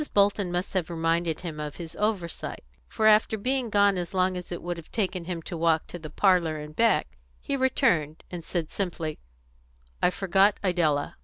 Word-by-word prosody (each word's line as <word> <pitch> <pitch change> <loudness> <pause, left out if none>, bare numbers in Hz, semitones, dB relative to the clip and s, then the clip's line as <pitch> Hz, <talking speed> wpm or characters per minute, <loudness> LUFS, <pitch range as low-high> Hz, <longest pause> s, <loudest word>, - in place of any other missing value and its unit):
Bolton 200 -2 +3
must 180 +2 -2
have 180 -4 -1
reminded 165 -1 0
him 165 -4 -6
of 150 -1 -5
his 165 -2 -8
oversight, 205 -6 -2 0.2
for 215 - -1
after 215 0 +5
being 255 +2 0
gone 200 -3 +3
so 175 +2 -6
long 185 0 +2
as 180 0 -7
it 175 - -5
would 175 0 -3
have 165 - -11
taken 185 -5 -1
him 170 -2 -4
to 175 - -6
walk 165 -1 +2
to 175 - -8
her 155 - -7
parlour 170 -2 +2
and 150 0 -8
back, 110 - +2 0.2
he 280 - -2
returned, 230 - +1
and 175 -2 -6
said 165 -2 -3
simply, 165 -5 -3 0.8
"I - - +5
forgot 195 +2 +3
Idella." 165 -6 +1
175 Hz, 185 wpm, -27 LUFS, 165-200 Hz, 0.8 s, after